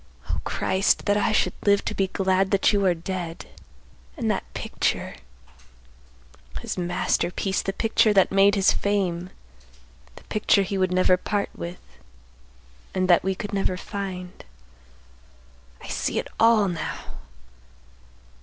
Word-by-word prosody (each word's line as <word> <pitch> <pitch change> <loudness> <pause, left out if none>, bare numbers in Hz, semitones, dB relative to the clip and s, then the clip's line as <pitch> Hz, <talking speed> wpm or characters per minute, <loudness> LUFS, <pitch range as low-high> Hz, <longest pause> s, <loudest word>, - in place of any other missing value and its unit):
O - - -2
Christ! 190 +1 +1
that 205 - +2
I 210 +2 +1
should 215 - +1
live 200 -1 +3
to - - -2
be 195 - 0
glad 190 0 +1
that 200 +2 +3
you 200 -1 +2
are 180 - +3
dead! 170 -2 -5 0.7
And - - 0
that - - -4
picture! - - -2 1.5
His - - -4
masterpiece, 180 +2 -1
the 195 - -2
picture 225 +2 +2
that 195 -2 +4
made 195 +1 +5
his 195 -1 +4
fame, 185 -3 -1 0.9
the - - -14
picture 210 -1 +2
he 195 - -4
would 185 -1 +1
never 185 0 +4
part 205 +2 -2
with, 175 +1 -7 1.2
and 185 0 +1
that 175 - +5
we 190 +1 0
could 205 +1 -6
never 195 -2 0
find! 185 -2 -6 1.4
I - - -9
see - - -2
it - - -2
all 225 -3 +5
now! 170 -4 -4
190 Hz, 135 wpm, -24 LUFS, 180-200 Hz, 1.5 s, made